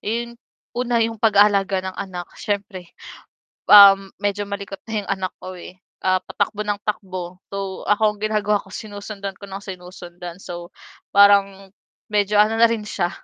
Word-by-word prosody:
yung 235 +2 -3 0.4
una, 245 -1 0
yung 225 -1 -4
pag-aalaga 200 -3 +3
ng 190 0 -5
anak 180 -3 -6
syyempre, 200 -3 -4 0.8
um, 195 -1 +9
medyo 205 0 -1
malikot 200 -1 -6
na 220 - -4
yung - - -7
anak 190 -1 -2
ko 185 0 -8
eh, 180 +1 -11 0.3
ah, 185 0 +2
patakbo 205 +1 -2
ng 205 -1 -1
takbo, 185 -4 -4
so, 195 -1 -5
ako 210 0 +3
ang - - -21
ginagawa 210 -1 +1
ko - - -19
sinusundan 205 -2 -7
ko 200 - -11
nang 195 0 -8
sinusundan. 180 -2 -9
So, 175 0 -8 0.4
parang 200 -1 +4 0.4
medyo 205 0 +2
ano 220 +1 0
na 230 - +7
rin 225 -2 -2
siya, 175 -4 -1
200 Hz, 160 wpm, -21 LUFS, 190-210 Hz, 0.8 s, um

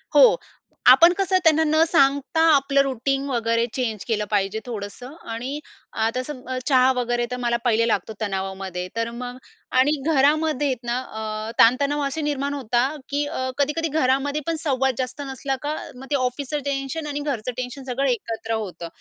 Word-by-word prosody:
हो, - - +8 0.5
आपण 330 +8 +8
कसं 380 -1 +2
त्यांना 320 -1 +5
न 315 +1 +4
सांगता 285 +1 +3
आपलं 275 0 +3
रुटीन 275 +1 -1
वगैरे 230 -2 +1
चेंज 225 -6 -2
केलं 215 -3 0
पाहिजे 205 +1 0
थोडंसं. 235 +3 -7 0.2
आणि 255 +6 -4 0.5
आता 255 +3 -1
सम 265 -1 -7 0.2
चहा 260 -2 +5
वगैरे 240 -1 0
तर 250 - -2
मला 235 0 +2
पहिले 230 -1 +3
लागतो 220 -1 -1
तणावामध्ये, 190 -2 -3
तर 230 0 -1
मग 250 0 -6 0.4
आणि 270 +3 +4 0.2
घरामध्ये 295 0 +2
ना, 240 +1 -1 0.5
अ, - - -4
ताणतणाव 280 +5 +4
असे 275 +3 -4
निर्माण 285 -1 -1
होतात, 260 +2 0
की 285 +1 0
अ, 260 -2 -3
कधी-कधी 295 +3 0
घरामध्ये 275 +2 +1
पण 330 - 0
संवाद 265 -3 +1
जास्त 255 +2 -3
नसला 270 +1 -2
का, 295 +1 -2 0.2
मग 260 +2 -10
ते - - +3
ऑफिसचं 270 +3 -1
टेन्शन 280 +2 -3
आणि 290 0 -3
घरचं 255 -5 -2
टेन्शन 255 +2 -5
सगळं 265 +1 -1
एकत्र 225 -1 -2
होतं. 200 -6 -4
260 Hz, 165 wpm, -23 LUFS, 235-285 Hz, 0.5 s, हो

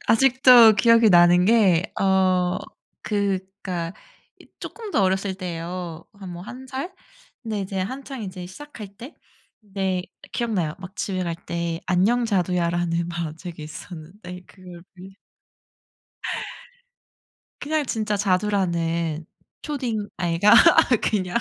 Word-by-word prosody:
아직도 250 -2 +7
기억이 230 -2 +5
나는 175 +1 +6
게 195 -6 +4 0.2
어 185 -2 +2 0.4
그러니까 190 -4 -3 0.5
이 - - -16
조금 445 -3 -8
더 205 - +2
어렸을 190 +1 0
때예요, 175 -2 -6
한 195 -3 -9
뭐 175 0 -8
1 255 +6 -10
살 275 +8 -5 0.5
근데 215 -3 -3
이제 195 0 -4
한창 260 +4 -5
이제 185 -2 -7
시작할 220 +1 -10
때. 250 +8 -10 0.5
네 190 -2 -2 0.3
기억나요. 200 -10 -1
막 185 +1 -10
집에 185 -2 -2
갈 170 -1 -3
때 170 -1 -4
안녕 205 +7 +2
자두야라는 175 -4 0
만화책이 170 0 -6
있었는데 180 +4 -10
그걸 180 -2 -13
빌 185 +1 -12 2.5
그냥 305 +1 -1
진짜 215 -2 -1
자두라는 170 -5 0 0.4
초딩 240 -8 -3
아이가 175 +3 +3 0.5
그냥 185 -2 -1
190 Hz, 230 characters per minute, -23 LUFS, 175-220 Hz, 2.5 s, 아직도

